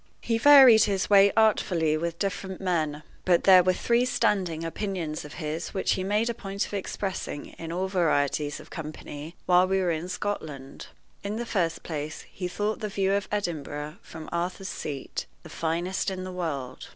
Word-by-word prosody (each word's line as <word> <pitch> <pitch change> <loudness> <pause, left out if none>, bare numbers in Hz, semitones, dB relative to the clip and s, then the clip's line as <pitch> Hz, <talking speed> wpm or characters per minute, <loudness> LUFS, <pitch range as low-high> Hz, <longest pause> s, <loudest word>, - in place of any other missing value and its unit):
He 230 -1 0
varied 260 -4 +9
his 200 -1 -1
way 200 0 +7
artfully 180 -8 +3
with 170 +1 -3
different 190 -1 -3
men, 155 -5 -1 0.2
but 175 -2 +3
there 185 -2 +8
were 185 +1 +3
three 235 +5 +2
standing 185 -9 0
opinions 165 -3 -3
of 150 - -10
his 160 +3 -4
which 190 - +1
he 185 - 0
made 210 +4 +1
a 235 - 0
point 200 -3 -3
of - - -11
expressing 190 -6 -4
in 165 0 -6
all 185 +3 -1
varieties 150 -5 0
of - - -14
company 155 0 -7
while 180 +1 +5
we 190 +1 +1
were 180 -2 +1
in 165 +2 -3
Scotland. 150 -10 -5 0.4
In 200 +1 -3
the 240 +2 -3
first 175 -8 -1
place, 150 -2 -5
he 180 - -4
thought 210 +4 -2
the 210 - -3
view 195 -1 +1
of 200 -1 0
Edinburgh 155 -5 -3
from 160 -1 -10
Arthur's 180 +2 -3
Seat 140 -3 -5 0.2
the - - -11
finest 170 +5 -1
in 185 -1 -5
the 185 - -6
world. 160 -8 -4
180 Hz, 180 wpm, -27 LUFS, 160-200 Hz, 0.4 s, varied